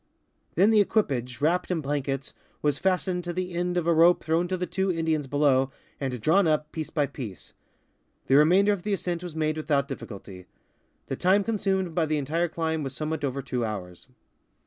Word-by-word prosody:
Then 195 +6 +5
the 215 -2 +6
equipage, 130 - 0
wrapped 175 +4 +1
in 180 -3 0
blankets, 140 -1 -3 0.3
was 145 -1 +1
fastened 185 -1 0
to 175 0 -4
the 180 0 -3
end 180 +1 -1
of 175 - 0
a 170 - +3
rope 170 +2 +5
throwai 165 +2 +1
to 185 - -1
the 180 - -2
two 190 +2 0
Indians 160 -4 -1
below 135 -2 +3 0.3
and 130 -3 -3
drawn 165 - +3
up, 155 -1 0
piece 155 -2 -5
by 145 -2 +1
piece. 110 -9 -8 0.7
The - - +1
remainder 185 +8 +5
of 200 - -4
the 210 +2 -1
ascent 175 -3 -2
was 175 -3 -7
made 155 -1 0
without 145 -3 0
difficulty. 100 -8 -9 0.6
The - - -3
time 195 +3 +3
consumed 190 -5 -1
by 160 -1 +1
the 155 0 0
entire 160 +5 0
climb 160 -1 -2
was 135 -2 -5
somewhat 155 +1 -3
over 135 0 -2
two 125 -2 -2
hours. 95 -5 -6
160 Hz, 190 wpm, -26 LUFS, 140-180 Hz, 0.7 s, the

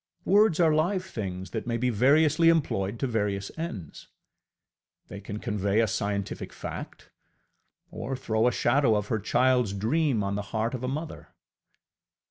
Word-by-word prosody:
Words 205 -3 +4
are 160 -3 +4
live 180 +5 +1
things 95 - -6
that - - -4
may 115 -1 0
be 125 +1 0
variously 150 +8 +4
employed 115 -10 0
to - - +1
various 105 -5 -2
ends. 115 - -7 1.0
They 100 - -8
can 105 +1 -6
convey 105 -2 0
a 115 - +4
scientific 100 -1 -3
fact, - - -8 0.8
or 135 +3 -4
throw 115 -3 0
a - - +3
shadow 120 0 +2
of 105 0 -2
her 110 - 0
childŌĆÖs 125 -1 +2
dream 125 +1 +1
on 100 0 -2
the 100 - -2
heart 115 +2 0
of 130 -1 -5
a - - -1
mother. 155 +5 -6
115 Hz, 155 wpm, -27 LUFS, 105-145 Hz, 1.0 s, Words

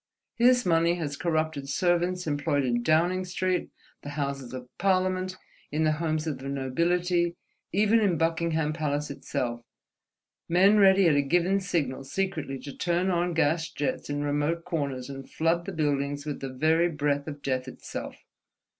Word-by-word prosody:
His 245 +1 +4
money 170 0 +3
has 150 -5 -3
corrupted 155 -3 -1
servants 180 +2 +1
employed 145 -2 0
in 120 -1 +1
Downing 170 +7 +2
Street, 185 0 -1 0.3
the 145 - -7
Houses 140 -3 -3
of 125 -1 -7
Parliament, 185 0 +1 0.3
in 155 +2 0
the 155 - +3
homes 155 0 -1
of 150 -5 -3
the 135 +1 -6
nobility, 170 +6 0 0.4
even 210 +4 +4
in 195 -6 +2
Buckingham 165 -1 0
Palace 150 -2 -2
itself, 120 -3 -3 0.9
men 195 +5 +5
ready 195 -2 +6
at 155 - +4
a 145 - +4
given 175 +7 +2
signal 150 -9 -2
secretly 150 -3 -3
to 140 - -8
turn 175 +2 0
on 175 -1 0
gas 160 +1 +1
jets 145 0 -3
in 145 0 -1
remote 145 +3 -1
corners 140 -6 -3
and 135 -1 -8
flood 165 +2 0
the - - -3
buildings 145 -3 -1
with 150 -2 -4
the 135 - -5
very 160 +6 +2
breath 145 -2 -1
of 145 -2 -7
Death 130 -1 -1
itself. 130 - -7
160 Hz, 160 wpm, -27 LUFS, 140-175 Hz, 0.9 s, ready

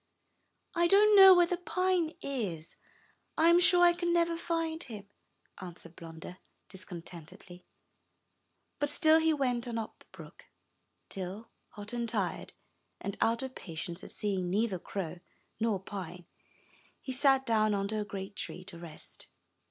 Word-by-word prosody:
'1 345 -1 +3
don't 415 +3 +6
know 385 -1 +10
where 350 -1 +5
the 350 +1 -2
pine 365 -2 0
is, 200 - -4 0.3
— - - -40
I 325 +1 +5
am 340 +1 +6
sure 355 0 +6
I 345 - +6
can 345 0 -1
never 340 -1 +2
find 330 -1 -2
him," 210 -5 -5 0.5
answered 175 -2 -7
Blunder, 165 +2 -10 0.3
discontentedly; 180 0 -10 1.1
but 290 0 0
still 315 +1 +5
he 320 0 +3
went 250 -5 -1
on 235 -1 -3
up 220 -1 -6
the - - -20
brook, - - -13 0.6
till, 195 +4 -6 0.2
hot 205 +2 -7
and 235 -1 -2
tired, - - -3 0.5
and 200 - -5
out 230 +2 +2
of 265 -1 -6
patience 170 0 -7
at - - -9
seeing 190 -4 -1
neither 200 0 0
crow 180 -2 -5 0.4
nor 220 -3 +1
pine, 180 -3 -8 0.7
he 265 - -6
sat 270 0 +3
down 215 -3 +2
under 200 +2 -2
a - - -1
great 200 0 -7
tree 180 - -6
to 175 -2 -10
rest. 165 -3 -11
220 Hz, 150 wpm, -31 LUFS, -, 1.1 s, know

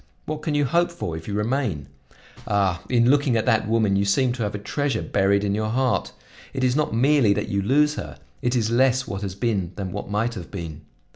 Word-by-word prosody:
What 155 0 -4
can 155 -1 -2
you 145 -1 +2
hope 170 +5 +2
for 130 - -5
if 80 0 -8
you 100 - -3
remain? 105 - -1 0.6
Ah! 95 -4 +1
in 120 0 +4
looking 140 -4 +2
at 110 - 0
that 110 -4 +2
woman 110 -3 +2
you 100 - +2
seem 120 +6 +2
to 125 - -6
have 105 -1 -2
a - - -2
treasure 135 +3 -2
buried 100 +1 +2
in 100 -1 0
your 110 +1 -1
heart. 130 +2 0 0.4
It 130 - -1
is 125 0 +2
not 150 0 +1
merely 125 -1 +4
that 105 +1 -3
you 100 0 0
lose 150 +8 +3
her, - - -6 0.2
it 125 +1 0
is 115 -2 +1
less 130 +1 +3
what 100 -1 -4
has 95 -2 -4
been 100 -5 -1
than 95 -3 -4
what 100 +1 -6
might 110 +3 0
have 90 -7 -8
been. 85 -5 -7
110 Hz, 230 wpm, -23 LUFS, 100-130 Hz, 0.6 s, in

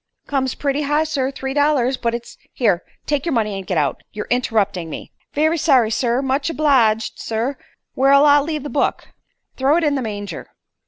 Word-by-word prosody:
"Comes 265 -3 -1
pretty 280 0 -1
high, 295 +2 +1
sir. 285 -4 -1
Three 270 -1 -5
dollars. 285 -3 +2
But 235 -2 -1
it's 235 0 -8
" - - -38
"Here. 205 -8 +1 0.2
Take 290 -2 0
your 335 - -1
money 215 -4 0
and 195 -2 -7
get 180 - -1
out. 145 -3 0
You're 210 - -5
interrupting 205 -8 0
me." - - -8 0.2
"Very 315 +3 +2
sorry, 255 -8 +3
sir. 245 +3 0
Much 275 +3 0
obleeged, 255 -9 +2
sir. 230 +5 -2 0.4
Where'll 275 +2 +5
I 290 0 +6
leave 300 0 -3
the 295 - -5
book?" 290 - -1 0.5
"Throw 275 +4 +3
it 345 - 0
in 295 -2 +2
the 275 - -1
manger." 205 -6 -6
265 Hz, 195 wpm, -20 LUFS, 225-290 Hz, 0.5 s, I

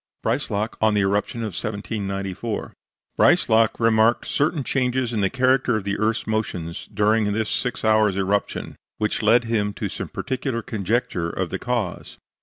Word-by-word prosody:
BREISLAK 105 +3 -1
ON 110 -1 +3
THE 105 - +3
ERUPTION 100 +4 0
OF 110 -4 -3
1794 100 0 -4 0.5
Breislak 110 0 +4
remarked 115 0 +3
certain 145 0 0
changes 125 -2 0
in 110 - 0
the 95 - +2
character 130 -2 +2
of 105 - -4
the 100 0 -2
earth's 110 +1 0
motions 95 -5 -3
during 105 0 +2
this 110 0 -1
six 125 -2 -1
hours' 110 -3 +3
eruption, 100 +1 -1 0.2
which 105 +1 -1
led 115 +3 +5
him 110 -3 0
to - - -4
some - - -5
particular 130 -2 -3
conjecture 105 -4 -1
of 90 0 -3
the - - -3
cause. 120 -7 -3
110 Hz, 155 wpm, -23 LUFS, 100-115 Hz, 0.5 s, led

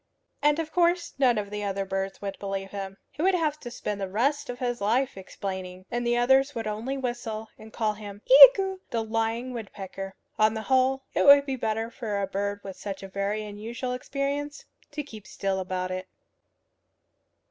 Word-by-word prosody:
And 295 +1 +4
of 320 -1 -3
course 345 0 +2
none 250 -4 +4
of 205 -1 -3
the 200 -2 -2
birds 195 +1 -3
would 195 -1 -4
believe 195 -1 -4
him. 195 -1 -6
He 295 - -6
would 375 +2 +4
have 305 -3 0
to 245 - -7
spend 210 -4 -4
the 195 - -1
rest 255 +10 0
of 245 - -4
his 245 -3 -2
life 250 +6 +1
explaining; 185 -1 -6
and 240 0 -1
the 240 0 +2
others 265 +3 +4
would 225 -1 -3
only 220 +6 -3
whistle, 240 -4 -4
and 220 0 -12
call 215 -2 0
him 205 -1 -10
Iagoo, 405 -7 +9
the 230 -3 -1
lying 225 +3 -1
woodpecker. 195 -3 -7 0.2
On 215 +1 +4
the 220 - -3
whole, 265 +1 +2
it - - +2
would 280 0 +9
be 270 -2 -2
better 225 -1 -2
for 215 -6 -3
a 200 - 0
bird 200 +1 -3
with 195 -1 -8
such 195 0 -6
a - - -6
very 200 +2 -2
unusual 230 +5 -5
experience 280 +3 -3 0.2
to 295 0 -4
keep 220 -7 -11
still 195 -1 -2
about 185 0 -3
it. 185 0 -4
225 Hz, 190 wpm, -27 LUFS, 200-265 Hz, 0.2 s, Iagoo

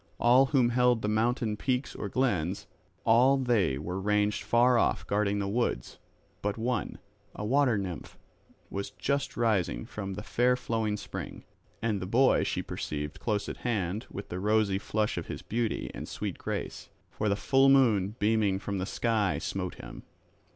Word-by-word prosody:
All 125 +3 +5
who 130 -4 +3
held 125 -1 +2
the - - 0
mountain 110 +1 +1
peaks 130 +4 -1
or 100 - -5
glens, 95 -8 0 0.4
all 125 +5 +5
they 120 - +1
were 90 +6 -4
ranged 105 0 +1
far 120 +4 +4
off 95 -5 +1
guarding 100 +1 +1
the 100 -1 -1
woods; 120 +5 -2 0.4
but 105 +1 -2
one, 115 -3 -2 0.4
a 105 - -4
water 130 -1 +3
nymph 95 -4 -6 0.5
was 100 0 -3
just 140 0 -2
rising 100 - +1
from 100 -2 -6
the 105 - -6
fair 125 +3 +2
flowing 110 -4 -1
spring; - - -7 0.4
and 110 -3 0
the 95 - -4
boy 130 +6 +4
she - - -2
perceived 75 0 -5
close 105 -3 -1
at - - -5
hand 105 -2 -2
with 100 - -7
the 90 - -4
rosy 105 -1 +2
flush 105 +1 -1
of - - -8
his - - -6
beauty 115 0 -2
and - - -7
sweet - - -4
grace. - - -5 0.2
For 110 - -1
the 100 - +2
full 135 +6 +4
moon 110 -7 +4
beaming 105 -2 +2
from 100 0 -4
the 90 - -2
sky 105 -11 0
smote - - -3
him. - - -10
105 Hz, 170 wpm, -29 LUFS, 100-120 Hz, 0.5 s, All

